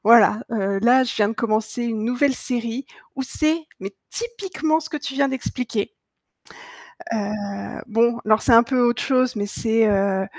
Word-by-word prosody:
voilà, 225 -1 +6
heu, 200 -3 0
là, 250 +3 +5
je 245 - -3
viens 205 -1 +3
de - - -2
commencer 220 +1 -1
une 225 -2 -2
nouvelle 250 +4 +1
série 240 +1 -2 0.3
où 270 - -2
c'est, 310 +4 0 0.2
mais 195 +1 -6 0.2
typiquement 385 -9 -2
ce 320 0 -7
que 300 - -3
tu 280 -2 -6
viens 280 0 +2
d'expliquer. 250 -4 -3 1.2
Heu, 205 -2 -4
bon, 235 +1 +2
alors 215 0 +3
c'est 250 - +2
un 230 - +8
peu 250 +1 0
autre 240 -1 +2
chose, 255 -3 +1
mais 205 - -2
c'est, 225 +2 +1
heu, 195 -1 +1
235 Hz, 175 wpm, -22 LUFS, 215-265 Hz, 1.2 s, un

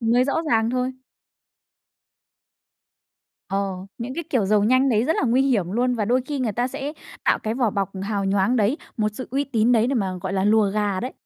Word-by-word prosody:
Mới 240 +2 +3
rõ 275 - -1 0.2
ràng 225 0 +2
thôi. 255 +1 -1 2.6
Ờ, 195 0 -1 0.3
những 250 +3 -5
cái 340 - -4
kiểu 245 -8 +2
giàu 210 0 +3
nhanh 255 +4 +3
đấy 225 -1 +2
rất 320 - +1
là - - 0
nguy 250 +3 +3
hiểm 210 -10 +1
luôn, 245 +3 +1
và 220 -3 -1
đôi 250 +4 +2
khi 290 -2 -3
người 240 -4 -1
ta 240 +5 -1
sẽ 280 +2 -5 0.3
tạo - - +3
cái 220 +1 -3
vỏ 240 -4 +1
bọc 195 -1 -2
hào 200 -1 -2
nhoáng 195 +5 +2
đấy, 220 +6 +2 0.2
một 215 -1 +1
sự 255 - -7
uy 275 +3 0
tín 240 -3 +2
đấy 230 -1 +4
để 270 - 0
mà, 195 -6 0
gọi 190 - -4
là, 190 0 0
lùa 210 -1 +4
gà 205 -2 -1
đấy. 255 - -4
230 Hz, 220 wpm, -23 LUFS, 205-255 Hz, 2.6 s, đấy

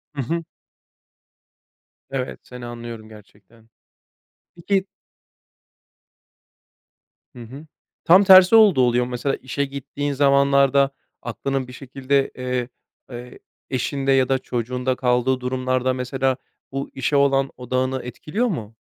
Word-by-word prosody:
Hı 140 - -2
hı. 165 +6 -2 1.7
Evet, 130 -1 -4
seni 125 -1 -10
anlıyorum 115 -2 -8
gerçekten. 110 +1 -19 0.9
Peki 190 +3 0 2.5
Hı 120 - -9
hı. 135 +7 -11 0.4
Tam 185 +4 +6
tersi 190 +1 +8
olduğu 210 -11 +6
oluyor 125 0 +2
mu? 125 - -8
Mesela, 135 +3 -1
işe 140 +2 -3
gittiğin 140 +1 -5
zamanlarda 140 0 +3 0.3
aklının 135 -2 -3
bir 125 - -11
şekilde, 135 +1 -1
eee, 125 -1 -3 0.4
e 120 +1 -9 0.3
eşinde 135 +2 -1
ya 130 -2 +3
da 135 0 +2
çocuğunda 125 +1 -2
kaldığı 125 0 +1
durumlarda, 130 0 -1
mesela, 130 +1 -1 0.3
bu 135 +1 -4
işe 135 +2 -1
olan 135 -1 +3
odağını 130 +1 -2
etkiliyor 155 - -3
mu? 115 - -5
130 Hz, 115 wpm, -22 LUFS, 125-140 Hz, 2.5 s, tersi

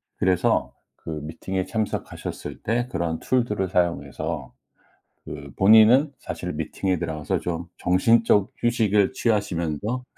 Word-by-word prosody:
그래서 90 -2 +1 0.2
그 - - -11
미팅에 90 +4 -4
참석하셨을 110 +2 -4
때 120 +2 0
그런 85 -5 -2
툴들을 105 -7 0
사용해서 85 -5 -2 0.7
그 70 -1 -8
본인은 110 +8 +6
사실 - - -5
미팅에 95 -2 -2
들어가서 80 -3 -2
좀 85 -1 -4
정신적 100 +2 +3
휴식을 110 -4 +2
취하시면서 105 - -1
95 Hz, 275 characters per minute, -24 LUFS, 85-110 Hz, 0.7 s, 본인은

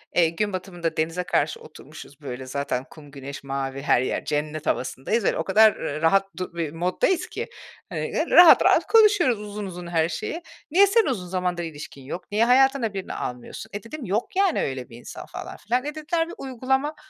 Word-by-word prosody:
Eee, 170 -2 +5
gün 205 +4 -2
batımında 175 -3 -4
denize 165 +3 -1
karşı 460 - 0
oturmuşuz, 155 - -13
böyle, 130 -1 -6
zaten 135 -1 -3
kum, 145 -3 -14
güneş, 140 0 -8
mavi 135 0 -4
her 125 - +3
yer, - - -2
cennet 150 +1 -2
havasındayız, 165 - -1
böyle, - - +1
o - - -1
kadar, 215 +2 +5
ııı, 150 +2 -4
rahat 195 +4 +4
du 185 -2 -5
bir 165 -3 -2
moddayız 185 - 0
ki, - - -5 0.4
hani, - - -4
ııı, - - 0
rahat 350 -2 +9
rahat - - +4
konuşuyoruz 410 - +5
uzun 210 0 -6
uzun 180 -2 -7
her 165 -1 +1
şeyi. 320 - -4 0.3
"Niye 395 +4 +6
senin 445 +2 +4
uzun 200 -9 -2
zamandır 180 -1 -2
ilişkin 145 -4 -8
yok? 175 +9 -7
Niye 220 +3 +3
hayatına 260 -3 +3
birini 195 -1 -5
almıyorsun?" 125 -1 -6
E, 205 - -5
dedim, 270 +3 -7
"Yok, 205 - -2
yani, 390 -2 +2
öyle 130 -2 -4
bir 115 - -11
insan." 120 - -9
falan - - -8
filan. 245 +4 -1
E, 295 +1 -4
dediler, 325 +2 -1
"Bir - - -8
uygulama" 265 +3 -1
185 Hz, 195 wpm, -24 LUFS, -, 0.4 s, rahat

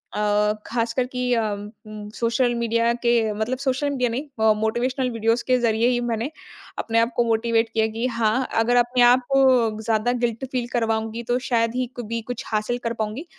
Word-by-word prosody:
अ, 210 0 +2
खासकर 230 +2 -1
कि 250 -1 -2
अम, 215 -3 -1 0.2
म 210 -1 -8
सोशल 240 +1 +1
मीडिया 230 0 +1
के 235 - +3 0.2
मतलब 220 +5 -2
सोशल 270 +1 -1
मीडिया 255 -3 0
नहीं, 235 -3 0
मोटिवेशनल 250 +4 0
वीडियोज़ 230 +1 0
के 255 -1 +4
ज़रिए 230 0 +2
ही 245 -1 +2
मैंने 235 +2 -2 0.5
अपने 230 0 +1
आप 230 +2 +2
को 240 - +3
मोटिवेट 230 0 +1
किया 220 0 +1
कि 230 +2 -1
हाँ, 230 +1 0
अगर 225 +2 +2
अपने 245 +1 +2
आप 245 +1 +6
को 250 -5 +3
ज़्यादा 220 +2 +1
गिल्ट 235 +2 -1
फ़ील 245 -2 -2
करवाऊँगी 225 0 -1
तो 245 +1 0
शायद 230 -1 +1
ही 255 -1 -1
कभी 230 -1 -4
कुछ 245 - -5
हासिल 215 +2 -1
कर 230 0 -1
पाऊँगी। 220 +9 -4
235 Hz, 185 wpm, -23 LUFS, 225-245 Hz, 0.5 s, आप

